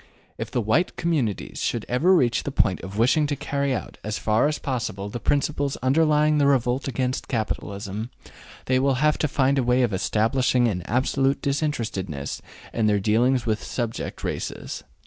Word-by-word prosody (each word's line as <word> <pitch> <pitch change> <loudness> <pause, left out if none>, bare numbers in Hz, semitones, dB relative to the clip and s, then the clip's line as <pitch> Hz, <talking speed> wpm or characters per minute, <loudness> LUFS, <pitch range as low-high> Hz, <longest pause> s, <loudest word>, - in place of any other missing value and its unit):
If - - -4
the 120 - -1
white 115 - +1
communities 145 - -1
should - - -1
ever 160 +10 +3
reach 125 -8 +2
the 140 - -4
point 100 -8 +1
of 95 +2 -8
wishing 140 +7 +3
to 145 - -1
carry 140 0 -1
out - - -7
as 105 0 -3
far 110 +5 +2
as 150 - -1
possible 110 -7 -3
the 120 - -5
principles 145 +1 0
underlying 150 +2 +3
the 140 - +4
revolt 130 -1 +1
against 130 -1 -2
capitalism, 105 -2 -3 0.6
they 130 0 +2
will 135 0 +2
have 150 +3 +2
to 155 - +2
find 135 0 +2
a - - +1
way 125 +1 +3
of 115 -4 0
establishing 120 +5 +2
an 95 -5 -1
absolute 135 +3 +1
disinterestedness 110 - -2 0.3
in 110 -2 +1
their 105 -1 +3
dealings 120 +5 +2
with 110 -2 0
subject 115 -2 -4
races. - - -4
125 Hz, 170 wpm, -24 LUFS, 110-140 Hz, 0.6 s, the